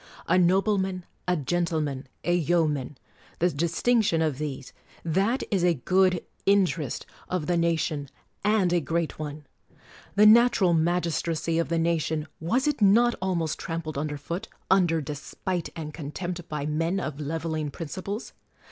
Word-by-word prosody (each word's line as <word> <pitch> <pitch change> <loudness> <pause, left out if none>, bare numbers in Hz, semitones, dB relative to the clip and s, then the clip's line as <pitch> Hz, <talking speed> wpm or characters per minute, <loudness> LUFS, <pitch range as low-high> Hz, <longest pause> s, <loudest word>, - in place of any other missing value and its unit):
A - - +3
nobleman, 190 0 +2 0.2
a 180 -1 +2
gentleman, 155 -3 -1 0.2
a 175 - +1
yeoman; 155 -5 +1 0.4
the 175 +1 +2
distinction 170 +5 +2
of 150 -4 -1
these: 140 -3 -5 0.3
that 195 - +1
is 190 -4 +2
a 175 -1 +4
good 185 +5 +2 0.2
interest 185 - +2 0.2
of 180 -4 -1
the 175 - +1
nation, 160 -4 0 0.3
and 200 -4 +3
a 175 - +4
great 165 +3 -2
one! 150 -1 -6 0.7
The 210 +1 +6
natural 220 -5 +6
magistracy 165 -1 0
of 170 - -1
the 165 - +1
nation, 160 -2 0
was 235 - +1
it 295 - 0
not 230 +4 +5
almost 175 -5 -1
trampled 165 -2 -4
under 145 +1 -2
foot, 170 +9 -5 0.2
under 175 -4 +4
despite 155 +5 -4
and 155 -2 -6
contempt, 175 +3 -5
by 150 -2 -3
men 165 +5 0
of 155 -5 -4
leveling 155 0 -2
principles 185 - -6
170 Hz, 140 wpm, -26 LUFS, 155-185 Hz, 0.7 s, The